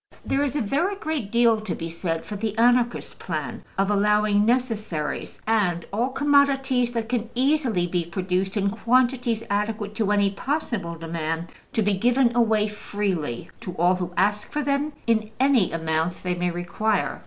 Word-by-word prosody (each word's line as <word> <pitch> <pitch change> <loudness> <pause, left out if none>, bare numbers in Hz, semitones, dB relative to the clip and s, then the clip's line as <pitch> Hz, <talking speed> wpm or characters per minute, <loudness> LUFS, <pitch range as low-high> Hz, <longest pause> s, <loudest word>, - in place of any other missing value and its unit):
There 275 - +1
is 285 -1 -2
a 295 - +1
very 310 - 0
great 310 - -3
deal 235 -2 +4
to 215 -5 -3
be 165 - -5
said 165 0 -3
for 210 - -6
the 215 +1 -3
Anarchist 240 +1 +2
plan - - -4
of 195 +1 +2
allowing 210 0 +3
necessaries, 220 - -1
and 195 -7 +1
all 235 +5 +1
commodities 270 -3 +2
that 230 -1 -2
can 235 -2 -2
easily 255 - +2
be 175 -1 -1
produced 185 +3 -2
in 200 0 +1
quantities 240 0 +1
adequate 210 +1 -2
to 215 -3 +1
any 200 -1 +3
possible 225 - -3
demand, 165 0 -4 0.2
to 220 - +1
be 205 0 +2
given 240 +4 +2
away 220 -3 +3
freely 195 - -3
to 190 -6 -6
all 175 +2 +3
who 180 -1 -3
ask 205 +2 +1
for 300 0 -1
them, 285 +2 0
in 220 -2 +1
any 260 -7 +3
amounts 160 +1 -1
they 180 - -2
may 180 0 -1
require. 175 +4 -1
210 Hz, 165 wpm, -24 LUFS, 180-245 Hz, 0.2 s, deal